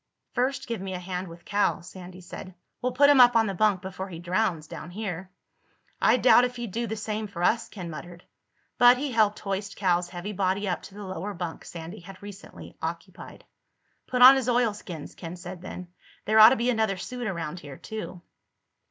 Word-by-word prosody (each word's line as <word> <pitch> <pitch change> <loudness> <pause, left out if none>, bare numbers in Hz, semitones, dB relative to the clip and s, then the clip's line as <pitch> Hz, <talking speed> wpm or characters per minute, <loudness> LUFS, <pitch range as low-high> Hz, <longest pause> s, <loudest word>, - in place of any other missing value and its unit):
"First 255 +3 0
give 230 -5 -4
me 190 -1 -4
a - - -4
hand 180 0 -4
with 170 0 -13
Cal," 205 -4 +1
Sandy 180 0 -11
said. 185 +1 -9 0.3
"We'll 250 - 0
put 280 +3 +5
him 275 -3 +7
up 245 -1 +7
on 225 -1 +5
the 200 - -2
bunk 195 0 +2
before 190 0 -6
he 170 - -7
drowns 175 -1 -1
down 160 - -8
here." 190 -2 -5 0.7
"I - - +5
doubt 245 - +6
if 250 0 -1
he'd 240 -4 -5
do 235 +4 -2
the 220 - -3
same 215 0 -3
for 175 -3 -6
us," 225 +5 +2
Ken 185 -5 -7
muttered. 170 +3 -9 0.6
But 245 +1 +8
he 280 +1 -3
helped 215 -3 +3
hoist 195 0 -4
Cal's 180 -2 +1
heavy 180 +4 -6
body 195 +1 0
up 180 -3 -1
to 195 - -13
the 205 - -8
lower 190 +2 -5
bunk 170 -2 -5
Sandy 170 +4 -8
had 185 +2 -12
recently 200 -1 -11
occupied. - - -7 0.6
"Put 250 -1 +3
on 260 +2 +11
his 255 -2 -1
oilskins," 210 -10 -1
Ken 170 0 -8
said 180 0 -9
then. 180 -1 -8 0.4
"There 215 +1 +4
ought 215 +1 +11
to 260 - +2
be 245 0 +1
another 220 -4 0
suit 245 +5 -5
around 170 -3 -4
here 145 -4 -10
too." 215 -5 -7
195 Hz, 205 wpm, -27 LUFS, 180-225 Hz, 0.7 s, on